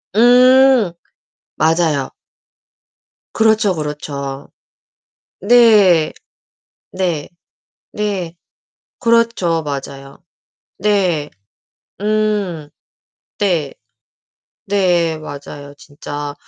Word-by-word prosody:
음. 250 -2 +5 0.7
맞아요. 160 -3 +1 1.2
그렇죠, 220 -3 +2
그렇죠. 145 -3 -6 0.9
네. 205 -7 +4 0.8
네. 175 -6 -2 0.6
네. 195 -5 -3 0.6
그렇죠. 230 -9 +1
맞아요. 140 +1 -7 0.6
네. 180 -7 0 0.7
음. 210 -7 -1 0.7
네. 170 -9 0 0.9
네 175 -5 +1
맞아요 145 -1 -10
진짜. 145 0 -7
175 Hz, 100 characters per minute, -17 LUFS, 150-210 Hz, 1.2 s, 음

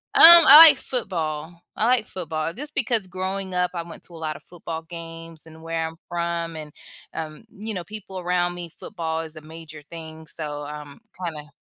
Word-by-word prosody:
Um, 415 - +5
I 330 -4 +10
like - - +2
football. 170 - -4
I 215 - 0
like 240 -2 +2
football 160 -3 -4
just 295 - -7
because 235 -6 0
growing 190 +1 -5
up, 180 0 0
I 170 - -3
went 170 - -13
to 175 - -12
a - - -10
lotta 155 -2 -5
football 165 -2 -8
games, 165 -1 -8
and 160 0 -15
where 165 0 -3
I'm 160 0 -8
from 170 -1 -3
and, 155 -1 -9 0.4
um, 155 +1 -7
you 215 +2 -5
know, 180 - -4
people 195 -2 -9
around 175 0 -1
me 175 -1 -8
football 165 -5 -4
is 160 0 -8
a 155 - -10
major 155 -1 -12
thing, 160 -1 -10
so 150 -2 -2
I'm 145 -1 -9 0.2
kinda 150 -4 -6
165 Hz, 190 wpm, -23 LUFS, 160-185 Hz, 0.4 s, I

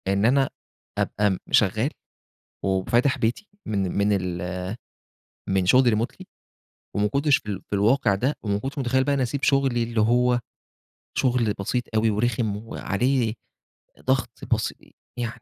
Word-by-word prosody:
إن 100 +2 +2
أنا 135 +2 +3 0.5
أبقى 105 0 +1
م 95 - 0
شغال - - +3 0.8
وفاتح 120 +8 +2
بيتي 120 - -1 0.2
من 100 -4 0
من 100 +1 +3 0.3
ال 90 +1 -4 0.9
من 95 -1 +1
شغل 130 +7 +6
remotely 115 +3 -3 0.7
وما 105 +1 +2
كنتش 140 +5 +3
في - - -15
ال 100 -2 -3
في - - -1
الواقع 105 +1 +3
ده، 130 +9 0
وما 100 -2 0
كنتش 135 +6 -5
متخيل 130 0 +2
بقى 140 +1 +1
إني 135 -2 +1
أسيب 130 +3 -3
شغلي 135 -4 +2
اللي 115 -1 0
هو 120 +2 +3 0.8
شغل 120 -5 +2
بسيط 120 +5 -1
أوي، 110 +1 +3
ورخم 110 -1 0
وعليه 115 +2 -1 0.7
ضغط 130 -2 +1 0.2
بسي - - -4 0.2
يعني 120 +1 -4
115 Hz, 145 wpm, -24 LUFS, 100-130 Hz, 0.9 s, شغل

